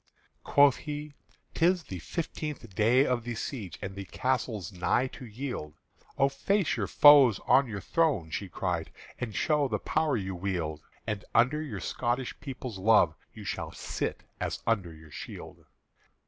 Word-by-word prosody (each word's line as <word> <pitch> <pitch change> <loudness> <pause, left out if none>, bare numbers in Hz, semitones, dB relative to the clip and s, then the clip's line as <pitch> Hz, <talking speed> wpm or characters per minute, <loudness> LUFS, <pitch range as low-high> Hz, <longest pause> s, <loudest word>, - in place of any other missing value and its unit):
Quoth 140 -2 +5
he, 150 -1 -6 0.4
"'Tis 175 +1 +3
the 95 - -7
fifteenth 150 - -5
day 120 +7 +4
of 125 -3 0
the 120 0 -4
siege, 110 - -5
And 95 - -4
the 100 0 -6
castle's 115 -3 -2
nigh 90 +8 +1
to 125 -1 -10
yield." 110 - -5 0.4
"O 135 - +5
face 180 +7 +1
your - - -1
foes 140 -8 +7
on 135 0 +5
your 105 -3 -5
throne," 140 - +1
she 100 +2 -3
cried, 90 -3 -2 0.3
"And 115 -5 -4
show 150 - +2
the 110 -4 -1
power 155 +3 0
you 95 -2 -3
wield; 85 -5 -3 0.2
And 105 -2 -3
under 135 +6 +4
your 155 - -5
Scotish 120 +1 -1
people's 130 -6 -6
love 105 +2 +5 0.2
You - - -10
shall - - -4
sit - - -4 0.2
as - - -3
under 100 -7 +1
your 80 -1 -14
shield." - - -9
120 Hz, 160 wpm, -29 LUFS, 95-140 Hz, 0.4 s, foes